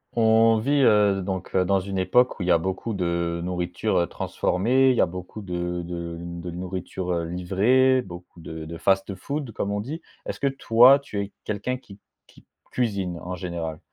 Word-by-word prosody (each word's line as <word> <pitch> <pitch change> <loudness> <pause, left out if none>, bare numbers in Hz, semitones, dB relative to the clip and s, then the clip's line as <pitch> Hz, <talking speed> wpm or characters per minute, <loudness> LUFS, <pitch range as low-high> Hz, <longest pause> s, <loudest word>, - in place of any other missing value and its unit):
On 115 0 +5
vit, 140 +6 +2
heu, 105 -3 +4
donc, 95 -1 -4
heu, 90 -1 +3
dans 100 +1 +2
une 95 0 -4
époque 125 +7 +2
où - - -4
il - - -3
y - - +4
a 85 - +6
beaucoup 95 +6 -3
de 85 -2 -1
nourriture, 90 +3 -1
heu, 85 - +1
transformée, 125 +8 +1
il 130 - +3
y - - +3
a - - +5
beaucoup 90 +4 -8
de 90 -1 -3
de 85 -1 -5
de 85 +1 -7
nourriture, 90 +1 -5
heu, 85 -1 -1
livrée, 105 +10 +2
beaucoup 90 -3 -11
de 80 -1 -7
de 85 +1 -7
fast-food 100 +8 -1
comme 100 -1 -3
on 105 0 -1
dit. 150 +9 -6 0.2
Est-ce - - -5
que 140 - +1
toi 130 -1 +6
tu 140 -7 -6
es 100 0 -6
quelqu'un 105 +5 -3
qui 100 -5 -15 0.3
qui - - -21 0.3
cuisine 100 -8 -1
en 90 +2 -5
général? 85 -3 -5
95 Hz, 195 wpm, -24 LUFS, 90-115 Hz, 0.3 s, a